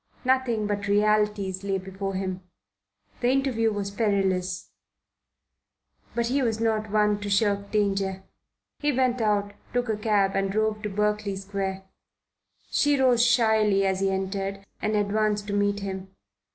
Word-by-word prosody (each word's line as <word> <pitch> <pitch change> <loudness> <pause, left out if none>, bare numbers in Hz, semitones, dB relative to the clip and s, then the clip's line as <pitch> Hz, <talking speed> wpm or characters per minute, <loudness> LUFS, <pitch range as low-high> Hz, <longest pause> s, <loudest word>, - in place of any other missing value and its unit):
Nothing 255 -4 +2
but 205 -1 -2
realities 205 -2 +1
lay 195 -1 0
before 190 +1 -5
him. 185 -1 -3 0.8
The 245 - +2
interview 255 -4 +1
was 200 -1 -3
perilous; 190 -4 0 1.4
but 235 - +1
he 265 +4 +1
was 225 -3 0
not 220 -1 0
one 210 0 +2
to 205 0 -5
shirk 200 0 +1
danger. 195 -2 0 0.6
He 295 0 +1
went 255 -2 +1
out, 205 -2 +1 0.2
took 245 -1 0
a 215 - 0
cab 210 -2 +2
and 195 0 0
drove 215 +1 0
to 210 - -3
Berkeley 210 0 0
Square. 195 0 -4 0.9
She 290 -1 +3
rose 250 -3 +4
shyly 220 -5 +3
as 190 -1 +1
he 195 0 +1
entered 195 +1 -3 0.2
and 215 0 0
advanced 210 0 +1
to - - -2
meet 205 0 +1
him. 190 -1 -5
205 Hz, 145 wpm, -26 LUFS, 195-220 Hz, 1.4 s, rose